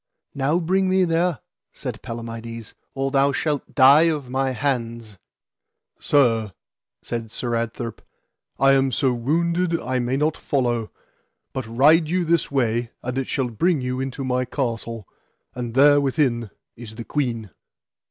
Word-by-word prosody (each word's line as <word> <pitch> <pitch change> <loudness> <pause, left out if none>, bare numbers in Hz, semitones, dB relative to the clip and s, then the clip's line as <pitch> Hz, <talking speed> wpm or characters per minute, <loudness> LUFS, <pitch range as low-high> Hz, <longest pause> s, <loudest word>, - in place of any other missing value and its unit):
Now 140 +4 +1
bring 185 +2 +1
me 190 0 +3
there, 170 -2 +1 0.3
said - - -6
Palamides, 115 -1 -7 0.2
or 135 0 -1
thou 140 0 +3
shalt 145 0 -2
die 145 +6 +7
of 145 -6 -3
my 135 +1 0
hands. 115 -5 -3 0.8
Sir, 115 -8 +2 0.5
said 115 -1 -4
Sir 120 +2 -3
Adtherp, 115 0 -3 0.6
I 135 +1 +5
am 135 -1 +3
so 130 +1 +1
wounded 170 +7 0
I 130 0 -2
may 125 +2 -1
not 150 +2 +1
follow, 120 -5 -1 0.6
but 130 -3 -4
ride 150 +7 +4
you 180 0 +1
this 170 +1 +1
way 120 -3 0
and 125 +1 -3
it 135 -1 -2
shall 130 -3 -1
bring 165 - +1
you 125 0 -2
into 135 +1 -4
my 125 -1 0
castle, 115 -5 -4 0.5
and 120 -2 -5
there 145 +1 +6
within 130 -5 0 0.3
is 110 -2 -10
the 115 0 -7
queen. 115 - -2
130 Hz, 145 wpm, -23 LUFS, 115-145 Hz, 0.8 s, die